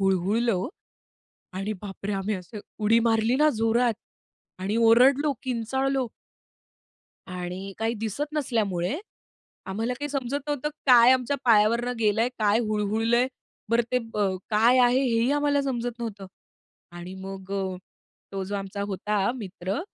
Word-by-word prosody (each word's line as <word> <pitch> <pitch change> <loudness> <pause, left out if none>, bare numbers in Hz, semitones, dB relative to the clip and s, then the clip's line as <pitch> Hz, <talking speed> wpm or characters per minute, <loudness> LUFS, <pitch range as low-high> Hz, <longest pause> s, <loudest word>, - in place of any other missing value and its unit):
हुळहुळलं 195 +5 +2
वो. 185 +1 -2 0.9
आणि 195 +3 -3
बापरे! 200 0 -5
आम्ही 195 +2 -1
असं 185 +4 -8 0.2
उडी 225 +2 +5
मारली 225 +2 +2
ना 305 +1 +5
जोरात. 225 +2 +2 0.7
आणि 195 +3 -2
ओरडलो, 255 +6 +5
किंचाळलो. 265 +2 -1 1.2
आणि 180 +1 -6
काही 225 +1 0
दिसत 225 +8 -4
नसल्यामुळे 220 - -1 0.7
आम्हाला 225 +6 -2
काही 290 +4 -5
समजत 275 0 -2
नव्हतं 290 0 -1 0.2
काय 245 -2 +8
आमच्या 260 +2 +2
पायावरनं 235 +2 +4
गेलंय? 220 +2 +2
काय 210 +1 +3
हुळहुळलंय? 220 +2 +1 0.4
बरं 230 +1 +3
ते 250 - +3 0.2
ब - - -5 0.3
काय 230 +4 +4
आहे 245 +2 +4
हेही 240 0 +2
आम्हाला 290 -1 +2
समजत 245 -3 -3
नव्हतं. 210 -4 -5 0.7
आणि 175 +1 -8
मग 190 0 -8
अ, 190 -2 -2 0.5
तो 195 -1 -3
जो 200 +2 -4
आमचा 200 0 -5
होता 205 +2 0
मित्र 195 -3 -4
225 Hz, 130 wpm, -26 LUFS, 195-250 Hz, 1.2 s, काय